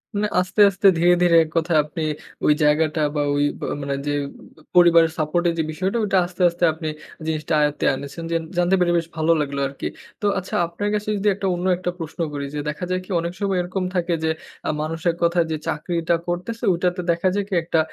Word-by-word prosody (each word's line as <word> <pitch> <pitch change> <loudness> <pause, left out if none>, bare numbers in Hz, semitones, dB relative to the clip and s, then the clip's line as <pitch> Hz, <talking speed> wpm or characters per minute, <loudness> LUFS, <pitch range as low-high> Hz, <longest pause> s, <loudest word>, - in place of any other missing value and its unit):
মানে 210 +1 +1
আস্তে, 185 +3 +1
আস্তে, 195 0 +2
ধীরে, 175 +2 +5
ধীরে 170 -1 +5
এক 160 - -8
কথায় 165 -1 +2
আপনি 155 +2 -5 0.4
ওই 150 - +6
জায়গাটা 155 +1 +2
বা 150 - +1
ঐ - - 0
আ - - -3
বা - - -3
মানে 140 0 -2
যে 145 - 0 0.6
পরিবারের 170 -2 +6
support 155 +2 0
এর - - 0
যে - - +2
বিষয়টা 190 +7 -1
ওটা 195 -2 +1
আস্তে, 180 +1 -8
আস্তে 170 +1 -6
আপনি 160 0 -4 0.4
জিনিসটা 155 -1 -2
আয়ত্তে 150 0 0
এনেছেন। 140 +5 -7
যে - - +1 0.2
জানতে 175 +2 +3
পেরে 175 -1 +3
বেশ 165 -1 -1
ভালো 160 +1 +2
লাগলো 140 -1 -3
আরকি। 140 - -5 0.3
তো - - -2
আচ্ছা 185 - -6
আপনার 190 +5 -3
কাছে 210 0 -3
যদি 200 +1 -1
একটা 195 0 -2
অন্য 175 +1 -3
একটা 180 0 -2
প্রশ্ন 160 +1 -7
করি 140 -1 -3
যে - - -2
দেখা 150 +4 -5
যায় 185 0 0
কি - - -23
অনেক 170 +1 -3
সময় 195 -2 0
এরকম 185 +2 -3
থাকে 175 -1 0
যে 160 - +2 0.4
আ - - +1
মানুষের 165 +2 -1
কথায় 170 0 +3
যে 155 - -1
চাকরিটা 170 +2 0
করতেছে 180 +7 -4
ঐটাতে 180 +1 -1
দেখা 170 +2 0
যায় 205 -1 0
কি - - -5
একটা 165 -1 +1
170 Hz, 220 wpm, -22 LUFS, 155-180 Hz, 0.6 s, ওই